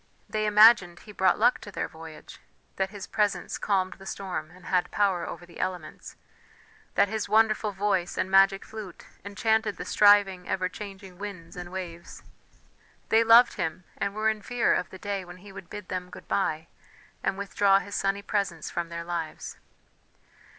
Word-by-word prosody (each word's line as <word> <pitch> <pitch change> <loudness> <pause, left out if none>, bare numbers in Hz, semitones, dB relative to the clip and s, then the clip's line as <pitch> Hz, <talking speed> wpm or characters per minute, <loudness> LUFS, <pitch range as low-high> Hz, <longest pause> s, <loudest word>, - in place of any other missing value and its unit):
They 215 0 -1
imagined 210 -4 +6
he 210 - -12
brought 190 -2 +2
luck 240 +3 +3
to 205 - -9
their - - -3
voyage, 160 -1 -12 0.4
that 190 0 0
his 200 -1 -8
presence 210 -2 -1
calmed 190 -2 0
the 195 - -11
storm 185 -6 -5
and 180 +1 -17
had 180 -1 +1
power 195 -4 +1
over 175 - -8
the 170 - -14
elements, 180 -4 -5 0.8
that - - +4
his 215 0 -3
wonderful 215 0 +3
voice 195 -2 -1
and 190 - -1
magic 195 0 +5
flute 215 -5 -9 0.2
enchanted 215 +1 0
the - - -6
striving, 200 -3 +4
ever 185 -1 0
changing 195 -2 -10
winds 195 -5 -8
and 175 0 -7
waves. 175 -2 -8 0.9
They 225 +1 +5
loved 230 +2 +7
him, 165 -1 -3
and 200 0 -3
were 215 0 0
in 215 -1 -7
fear 245 +2 +1
of 180 - -1
the 190 - -10
day 200 0 -3
when 175 0 -11
he 195 +2 -13
would 190 -3 -11
bid 210 -2 -8
them 180 -1 -4
good - - -12
bye 160 -5 0 0.6
and 190 - -1
withdraw 200 0 +3
his 200 +1 -5
sunny 195 +1 -1
presence 195 -6 -2
from 170 -1 -3
their 170 0 -5
lives. 170 -2 -5
195 Hz, 175 wpm, -27 LUFS, 180-210 Hz, 0.9 s, loved